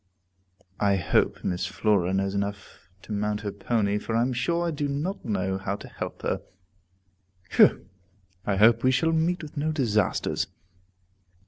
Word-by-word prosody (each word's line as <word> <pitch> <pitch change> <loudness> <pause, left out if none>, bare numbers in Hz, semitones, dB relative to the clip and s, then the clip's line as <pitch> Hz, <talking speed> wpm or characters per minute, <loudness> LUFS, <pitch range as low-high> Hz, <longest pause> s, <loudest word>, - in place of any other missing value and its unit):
I 100 -1 +3
hope 90 - +1
Miss 90 0 -1
Flora 100 -3 +1
knows 95 0 0
enough 100 -1 -5
to - - -10
mount 105 0 -1
her 105 -1 -3
pony, 105 0 0
for 110 - -3
I 115 - +3
am 130 +1 0
sure 170 +8 0
I - - 0
do 145 -1 -2
not 155 +8 -3
know 95 -3 -1
how 95 +1 -2
to - - -10
help - - -7
her. - - -1 1.1
Whew! - - +5 0.6
I 100 - 0
hope 115 +3 +5
we 130 - +5
shall 165 +6 +2
meet 165 +2 +1
with 150 - -9
no 155 +2 0
disasters! 115 -9 0
105 Hz, 160 wpm, -26 LUFS, 100-140 Hz, 1.1 s, Whew